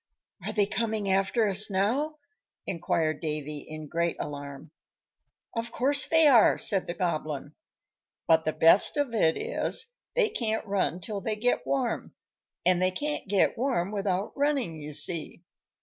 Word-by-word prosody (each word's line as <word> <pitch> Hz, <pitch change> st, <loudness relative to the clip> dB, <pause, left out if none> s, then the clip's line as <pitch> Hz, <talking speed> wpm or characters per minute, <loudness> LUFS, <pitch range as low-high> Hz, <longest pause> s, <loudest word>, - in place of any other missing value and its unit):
"Are -, -, -3 dB
they 205 Hz, -2 st, +2 dB
coming 215 Hz, -2 st, -2 dB
after 195 Hz, +4 st, +1 dB
us 200 Hz, +2 st, +3 dB
now?" 235 Hz, +11 st, 0 dB, 0.5 s
inquired 165 Hz, -3 st, -1 dB
Davy, 150 Hz, -2 st, -4 dB
in 155 Hz, +1 st, -9 dB
great 170 Hz, +2 st, -1 dB
alarm. 140 Hz, -1 st, -7 dB, 0.8 s
"Of 230 Hz, +1 st, -3 dB
course 270 Hz, +2 st, +3 dB
they 320 Hz, +1 st, +5 dB
are," 250 Hz, -7 st, +6 dB
said 195 Hz, -2 st, +3 dB
the 175 Hz, -, -4 dB
Goblin. 155 Hz, -4 st, -3 dB, 0.7 s
"But 160 Hz, -1 st, +4 dB
the 155 Hz, -, 0 dB
best 165 Hz, -, +5 dB
of 285 Hz, -5 st, -1 dB
it 165 Hz, -7 st, +2 dB
is, 475 Hz, 0 st, -1 dB, 0.3 s
they 475 Hz, -3 st, +3 dB
can't 225 Hz, -, -2 dB
run 185 Hz, -5 st, -1 dB
till 205 Hz, +1 st, -5 dB
they 215 Hz, +2 st, -2 dB
get 245 Hz, +4 st, -1 dB
warm, 260 Hz, -4 st, -2 dB, 0.5 s
and 180 Hz, 0 st, +3 dB
they 185 Hz, -, +3 dB
can't 295 Hz, +10 st, -4 dB
get 200 Hz, +3 st, +1 dB
warm 240 Hz, -8 st, 0 dB
without 195 Hz, -1 st, -2 dB
running, 280 Hz, -, 0 dB
you 150 Hz, 0 st, -7 dB
see. 165 Hz, +2 st, 0 dB
195 Hz, 150 wpm, -27 LUFS, 165-235 Hz, 0.8 s, are